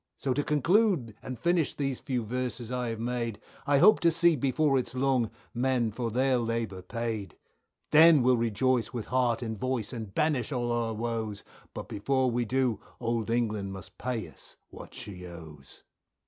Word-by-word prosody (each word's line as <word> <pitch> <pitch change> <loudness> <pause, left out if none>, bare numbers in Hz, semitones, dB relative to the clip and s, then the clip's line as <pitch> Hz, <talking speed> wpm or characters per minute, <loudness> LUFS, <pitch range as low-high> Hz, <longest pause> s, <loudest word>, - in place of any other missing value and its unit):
So 135 -2 -1
to 145 - 0
conclude 160 - +2
and 130 - -6
finish 165 +4 +1
these 135 -3 -2
few 125 -3 -2
verses 125 0 -3
I 125 -1 -1
have 115 -1 -4
made, 115 -2 -2 0.3
I 140 0 +4
hope 215 +9 +7
to 170 - +4
see 170 0 +4
before 140 +1 +2
it's 125 - -5
long 130 -3 +2 0.2
men 125 -2 +1
for 115 +2 -3
their 130 +2 +2
labour 115 -5 -2
paid, 110 0 -4 0.5
Then 155 -2 +7
we'll 125 0 +5
rejoice 115 +1 +1
with 120 -3 -4
heart 125 -2 +2
and 110 -1 -3
voice 130 -1 -2
and 110 -5 -6
banish 145 0 0
all 120 -3 -1
our 115 -1 -1
woes, 110 -2 -3 0.3
But - - -6
before 130 +5 0
we 120 0 0
do 125 -1 +1 0.2
old 115 -1 -1
England 110 -4 -1
must 95 -3 -10
pay 125 -3 -3
us - - -11
what - - -11
she 95 -3 -7
owes. 80 -5 -10
120 Hz, 175 wpm, -29 LUFS, 110-130 Hz, 0.5 s, hope